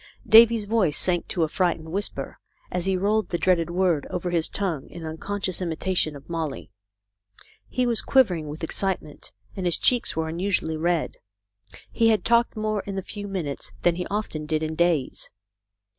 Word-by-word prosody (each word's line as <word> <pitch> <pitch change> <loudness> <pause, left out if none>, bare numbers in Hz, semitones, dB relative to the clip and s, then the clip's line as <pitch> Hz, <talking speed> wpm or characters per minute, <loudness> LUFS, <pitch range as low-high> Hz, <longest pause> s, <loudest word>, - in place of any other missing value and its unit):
Davy's 225 -1 +7
voice 200 -8 +1
sank 175 -2 0
to 170 - 0
a - - +2
frightened 165 -1 -1
whisper 200 +4 -3 0.3
as 180 +1 -2
he 190 -1 +2
rolled 210 +3 +1
the 175 - -1
dread 170 -2 +2
word 175 -4 +1
over 180 0 -3
his 165 -2 +3
tongue 175 -9 -3
in 170 -2 -8
unconscious 185 +4 -3
imitation 170 -2 -1
of 140 0 -12
Molly. 150 - -4 1.0
He 255 - 0
was 235 -2 +2
quivering 185 - +2
with 150 +3 -7
excite 190 +3 -1
ment, 150 - -13 0.2
and 185 -3 -2
his 175 - +4
cheeks 240 -2 +2
were 160 0 -1
unusually 170 -1 -1
red. 170 0 -1 0.7
He 230 - +2
had 215 -5 +2
talked 235 0 +3
more 215 -1 -1
in 200 - -4
the 190 - -3
few 205 +1 -6
minutes 170 -8 -4
than 175 - +4
he 180 +1 -4
often 195 -7 -3
did 155 0 0
in 155 0 -2
days. 165 -4 0
175 Hz, 175 wpm, -25 LUFS, 160-205 Hz, 1.0 s, Davy's